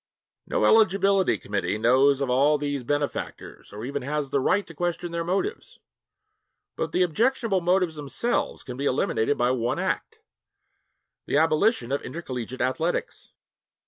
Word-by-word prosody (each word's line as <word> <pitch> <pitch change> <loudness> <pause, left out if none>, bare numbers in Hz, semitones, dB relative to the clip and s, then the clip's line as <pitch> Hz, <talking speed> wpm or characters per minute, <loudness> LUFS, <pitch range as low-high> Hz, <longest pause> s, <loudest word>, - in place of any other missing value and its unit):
No - - +1
eligibility 195 -3 +4
committee 105 +1 -2
knows 130 +5 +4
of 135 - -1
all 145 +4 +4
these 145 -1 -2
benefactors 145 +3 -4
or 105 +3 -7
even 140 +2 -3
has 140 +1 -3
the 140 - +2
right 195 +9 +1
to 165 - -12
question 175 +2 -3
their 170 0 -2
motives. 195 - -3 1.0
But - - -3
the 185 - +2
objectionable 220 - +1
motives 175 -2 +1
themselves 150 - -2
can 125 -1 -8
be 140 - -3
eliminated 130 -1 +1
by 120 +1 +2
one 120 -2 -1
act - - -2 1.1
the - - +1
abolition 160 - +2
of 140 - 0
intercollegiate 130 -5 -6
athletics. 160 +7 -2
145 Hz, 145 wpm, -25 LUFS, 130-180 Hz, 1.1 s, eligibility